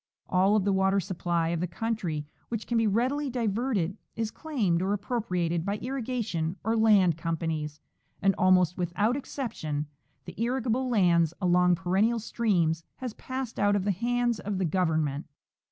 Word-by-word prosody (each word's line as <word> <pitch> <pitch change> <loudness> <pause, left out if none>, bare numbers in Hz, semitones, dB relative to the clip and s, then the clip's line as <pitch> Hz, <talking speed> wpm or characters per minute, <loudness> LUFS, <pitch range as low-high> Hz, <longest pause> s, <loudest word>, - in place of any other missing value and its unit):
All 190 +3 +3
of 205 -3 +2
the 200 - +2
Avater 190 +1 +3
supply 175 -3 -1
of 170 -1 -1
the 180 - -1
country 175 -5 -3 0.2
which 225 -2 -3
caii 240 - -2
be 225 -1 +3
readily 260 +7 +1
diverted 220 -5 -1 0.2
is 225 -1 -2
claimed 215 - 0
or 195 +2 +1
appropriated 180 -6 -1
by 200 +3 -1
irrigation 230 -10 -2
or 225 +2 +1
land 205 -7 +4
companies, 160 -2 -3 0.4
and 195 0 +3
almost 185 -1 +3
without 205 +7 +1
excep 270 -3 -4
tion 150 -7 -3 0.4
the - - -8
irrigable 250 +1 0
lands 175 -7 +3
along 180 -1 +4
perennial 190 +6 +1
streams 180 -8 0
has 250 -4 -5
passed 255 -1 -5
out 205 0 +3
of 200 - 0
the 205 - +1
hands 240 +3 0
of 205 -1 -3
the 190 - 0
Government. 160 -4 0
195 Hz, 160 wpm, -28 LUFS, 170-230 Hz, 0.4 s, land